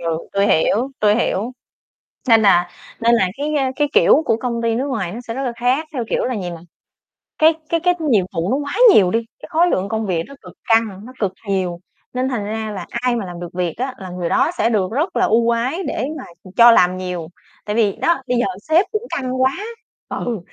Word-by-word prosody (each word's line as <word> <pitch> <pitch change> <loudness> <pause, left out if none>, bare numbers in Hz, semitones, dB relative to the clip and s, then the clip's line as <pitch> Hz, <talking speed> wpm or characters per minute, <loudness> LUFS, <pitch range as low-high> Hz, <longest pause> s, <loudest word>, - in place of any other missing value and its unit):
ừ, 165 -1 -1
tui 200 +1 +2
hiểu, 215 +9 +2
tui 210 0 +4
hiểu. 225 0 -1 0.8
Nên 225 -1 +6
là 175 -3 +4 0.3
nên 235 0 +4
là 190 -5 +3
cái, 300 +2 -2
ơ, 270 -2 +1
cái 295 -1 +1
kiểu 315 - +5
của 225 - +2
công 235 -1 -3
ty 230 -1 +1
nước 260 +5 -1
ngoài 200 -9 -3
nó 235 - -6
sẽ 230 - -3
rất 270 - -3
là 250 -3 -2
khác, 260 +6 +1
theo 250 -5 -2
kiểu - - 0
là 255 - -1
gì 175 - -4
mà 170 - -8 0.8
cái 315 +1 +5 0.2
cái 335 - +1
cái 360 +2 +2 0.2
nhiệm 205 -7 +3
vụ 165 +3 -1
nó - - +2
quá 285 0 -4 0.2
nhiều 185 -3 +5
đi, 230 - +2 0.2
cái - - -10
khối 335 +3 +3
lượng 195 - 0
công 220 0 -2
việc 175 -4 -1
nó 280 - -12
cực - - -13 0.2
căng, 220 -3 +1
nó 255 - -11
cực 200 -4 0 0.2
nhiều, 185 -3 -1 0.3
nên 255 +1 -1
thành 230 -6 -3
ra 220 +1 -4
là 190 -4 -6
ai 240 0 -1
mà 220 -5 -3
làm 175 -1 -8
được 175 -1 -6
việc 175 -2 -2
á 260 +2 -3
là 190 - -8
người 180 -1 -3
đó 330 - +2
sẽ 230 - +2
được 200 -4 0
rất 295 +10 -1
là - - +3
ưu 230 +1 +2
ái 255 +10 -1
để 245 - -2
mà 265 - -7 0.3
cho 235 0 +9
làm 185 -4 +4
nhiều. 180 -3 -4 0.4
Tại 210 0 -2
vì, 210 -4 +2
đó, 340 -4 +1
bây 250 -1 +1
giờ 240 - +2 0.2
sếp 335 +5 +4
cũng 430 +1 -2
căng 255 -1 -2
quá. 260 0 +4 0.6
Ừ, 235 -4 -3
230 Hz, 240 wpm, -19 LUFS, 190-260 Hz, 0.8 s, cho